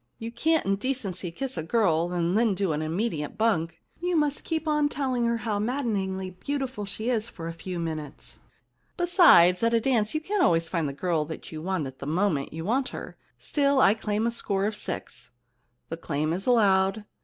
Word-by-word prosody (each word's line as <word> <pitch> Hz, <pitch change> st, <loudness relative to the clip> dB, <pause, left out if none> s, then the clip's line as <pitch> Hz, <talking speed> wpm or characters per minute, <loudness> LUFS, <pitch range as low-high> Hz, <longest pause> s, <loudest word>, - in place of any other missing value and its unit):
You 225 Hz, +1 st, -6 dB
can't 320 Hz, +6 st, +1 dB
in 195 Hz, 0 st, +2 dB
decency 205 Hz, -7 st, -3 dB
kiss 260 Hz, +9 st, -4 dB
a -, -, -3 dB
girl 175 Hz, -4 st, +1 dB
and 175 Hz, +1 st, 0 dB
then 220 Hz, -2 st, +3 dB
do 190 Hz, -2 st, 0 dB
an 150 Hz, -, -2 dB
immediate 160 Hz, 0 st, -2 dB
bunk. 170 Hz, -7 st, 0 dB, 0.2 s
You 355 Hz, 0 st, -1 dB
must 295 Hz, -2 st, +1 dB
keep 320 Hz, -1 st, -3 dB
on 300 Hz, -1 st, +2 dB
telling 260 Hz, -4 st, -1 dB
her 235 Hz, 0 st, +1 dB
how 215 Hz, -2 st, -2 dB
maddeningly 205 Hz, -6 st, -2 dB
beautiful 260 Hz, +2 st, -4 dB
she 220 Hz, +5 st, -3 dB
is 225 Hz, -2 st, 0 dB
for 165 Hz, -7 st, -8 dB
a 165 Hz, -, -4 dB
few 175 Hz, +2 st, -6 dB
minutes. 155 Hz, -4 st, -6 dB, 0.6 s
Besides, 340 Hz, -, +6 dB
at 230 Hz, 0 st, +3 dB
a -, -, +4 dB
dance 225 Hz, -1 st, +1 dB
you -, -, +2 dB
can't 400 Hz, +4 st, -1 dB
always 165 Hz, -1 st, +3 dB
find 160 Hz, -4 st, -1 dB
the -, -, -6 dB
girl 160 Hz, 0 st, -1 dB
you 155 Hz, -1 st, -7 dB
want 185 Hz, -3 st, -1 dB
at 130 Hz, 0 st, -9 dB
the 140 Hz, -, -6 dB
moment 160 Hz, -3 st, 0 dB
you 160 Hz, +1 st, -6 dB
want 255 Hz, +5 st, 0 dB
her. -, -, -8 dB, 0.2 s
Still, 280 Hz, -2 st, +1 dB
I 205 Hz, -, +6 dB
claim 215 Hz, 0 st, -2 dB
a 235 Hz, -, +1 dB
score 200 Hz, -4 st, -1 dB
of 210 Hz, +1 st, -1 dB
six.' 125 Hz, -, -6 dB, 0.3 s
* 120 Hz, 0 st, -46 dB
The 165 Hz, -, -4 dB
claim 155 Hz, -1 st, -2 dB
is 190 Hz, +6 st, -4 dB
allowed. 200 Hz, -3 st, +3 dB
200 Hz, 200 wpm, -26 LUFS, 170-245 Hz, 0.6 s, Besides